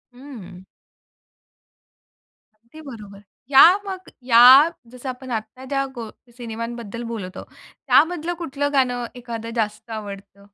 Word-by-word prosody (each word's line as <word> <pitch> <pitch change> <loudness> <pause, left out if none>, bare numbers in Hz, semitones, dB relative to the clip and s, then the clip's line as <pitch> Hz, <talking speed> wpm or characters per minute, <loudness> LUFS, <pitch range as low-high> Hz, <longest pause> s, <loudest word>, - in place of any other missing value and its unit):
हं. 205 -9 -12 1.9
अगदी 235 +8 -17
बरोबर. 210 -8 -11 0.3
या 270 - +8 0.2
मग, 375 -1 -7
या 240 -2 +5 0.5
जसं 250 +1 -8
आपण 255 0 -7
आत्ता 225 +3 -6
ज्या 275 0 -1
गो 230 -2 -7 0.3
सिनेमांबद्दल 230 -1 -7
बोलत 185 -5 -7
आहोत, - - -9 0.4
त्यामधलं 345 +1 +2
कुठलं 285 -3 -3
गाणं 250 -3 +1
एखादं 230 -2 -7
जास्त 215 +1 -3
आवडतं? 200 -2 -9
235 Hz, 115 wpm, -22 LUFS, 215-270 Hz, 1.9 s, या